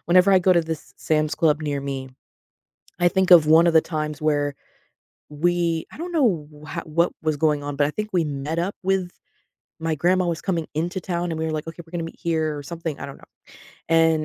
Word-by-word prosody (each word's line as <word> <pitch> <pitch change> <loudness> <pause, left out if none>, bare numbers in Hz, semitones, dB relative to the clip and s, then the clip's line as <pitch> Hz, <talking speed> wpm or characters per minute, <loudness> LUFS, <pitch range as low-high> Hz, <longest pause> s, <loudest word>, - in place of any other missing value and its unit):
whenever 185 +3 +5
I 190 - +7
go 185 +1 +4
to 170 - +4
this 160 -1 -6
Sam's 155 -1 0
Club 155 -3 +2
near 145 -2 -2
me, 135 -1 -4 0.9
I 175 - +4
think 190 +1 +1
of 165 -4 +8
one 165 +2 +6
of 170 - +3
the 160 - +6
times 155 -2 -4
where 145 -2 +1 0.7
we 170 +1 0
I - - -12
don't 350 +1 -5
know 195 - +1 0.3
h - - -2
what 170 +2 +1
was 155 -1 0
going 150 -1 +1
on, 145 0 -5
but 145 0 +3
I - - -2
think 215 +6 -4
we 175 -3 +2
met 145 +2 -3
up 180 +4 -1
with 190 -1 0 0.7
My 160 0 -1
grandma 180 +4 +2
was 170 -1 -2
coming 170 -5 -2
into 175 +5 -2
town, 175 -1 -2
and 160 - -4
we 160 - -1
were 160 - -2
like, 155 0 -4
"Okay, 165 +1 -7
we're 160 - -20
gonna 175 -2 -3
meet - - -26
here," 155 -2 0
or 145 - -7
something. 165 0 -5
I - - -5
don't 140 - -9
know. - - -19 0.6
And 160 -1 +3
160 Hz, 230 wpm, -23 LUFS, 150-175 Hz, 0.9 s, of